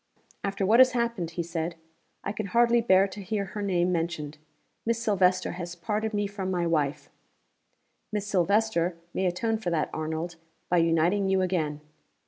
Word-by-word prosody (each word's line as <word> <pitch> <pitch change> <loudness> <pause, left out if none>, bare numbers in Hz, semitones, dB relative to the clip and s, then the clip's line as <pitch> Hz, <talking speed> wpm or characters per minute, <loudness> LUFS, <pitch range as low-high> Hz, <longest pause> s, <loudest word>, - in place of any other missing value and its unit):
"After 200 0 -1
what 220 +5 +5
has 255 -1 +7
happened," 235 -8 -1
he 170 - 0
said, 165 0 -3 0.5
"I 200 - -2
can 215 -1 -4
hardly 235 +3 +4
bear 195 -3 +5
to 200 +1 -9
hear 200 +1 -2
her 205 +2 -6
name 180 -3 +1
mentioned. 160 -3 -2 0.4
Miss 230 0 +1
Silvester 185 -5 +2
has 175 -1 -6
parted 215 +5 -2
me 205 -1 0
from 200 -2 -4
my 175 -2 0
wife." 150 -4 -1 1.0
"Miss 210 -1 -2
Silvester 195 -2 +1 0.2
may 190 - +1
atone 220 +5 0
for 190 -5 -2
that, 165 -3 0
Arnold, 160 +2 -3 0.3
by 180 - +3
uniting 170 +4 +2
you 190 0 +3
again." 160 -5 -1
185 Hz, 165 wpm, -27 LUFS, 170-210 Hz, 1.0 s, has